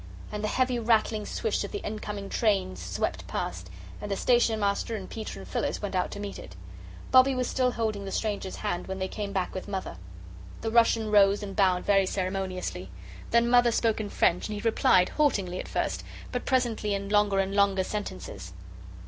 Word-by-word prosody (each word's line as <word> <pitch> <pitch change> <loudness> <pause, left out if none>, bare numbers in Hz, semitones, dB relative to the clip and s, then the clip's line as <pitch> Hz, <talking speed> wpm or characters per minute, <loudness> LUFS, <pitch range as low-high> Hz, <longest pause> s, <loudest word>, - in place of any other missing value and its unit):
And 210 0 -4
the - - +1
heavy 255 +2 +1
rattling 220 -2 +1
swish 450 - -1
of - - -6
the 410 - -5
incoming 210 -1 -5
train 195 - +1
swept 90 0 -3
past, 90 +1 -4 0.3
and 205 - -5
the 200 - 0
Station 240 -3 +3
Master 200 +2 0
and 195 -3 -6
Peter 220 - -6
and 95 -1 -9
Phyllis 90 - -2
went 205 -2 -4
out 180 -1 0
to 205 - -7
meet 205 -1 -5
it. - - -11 0.6
Bobbie 260 +1 +6
was 255 -1 0
still 250 -1 +1
holding 215 -4 -2
the 195 - -6
stranger's 205 -3 -2
hand 180 -4 -3
when 190 0 -4
they 190 0 -2
came 205 0 -5
back 190 -2 -2
with 185 - -5
Mother. 190 - -4 0.6
The 225 - -2
Russian 225 -2 +3
rose 200 0 +5
and 195 -1 -6
bowed 185 -3 +2
very 195 -2 +4
ceremoniously. 185 - -3 0.4
Then 235 0 +4
Mother 245 0 +5
spoke 225 -1 +1
in 205 - -5
French, 180 -2 +2
and 210 - -3
he 205 - -5
replied, 185 -4 +4
haltingly 200 -12 +1
at - - -5
first, - - -2 0.3
but 250 - -3
presently 235 -5 +1
in 200 0 -4
longer 205 -1 +3
and 195 0 +1
longer 200 -1 +3
sentences. 95 - -6
205 Hz, 195 wpm, -28 LUFS, 190-225 Hz, 0.6 s, Bobbie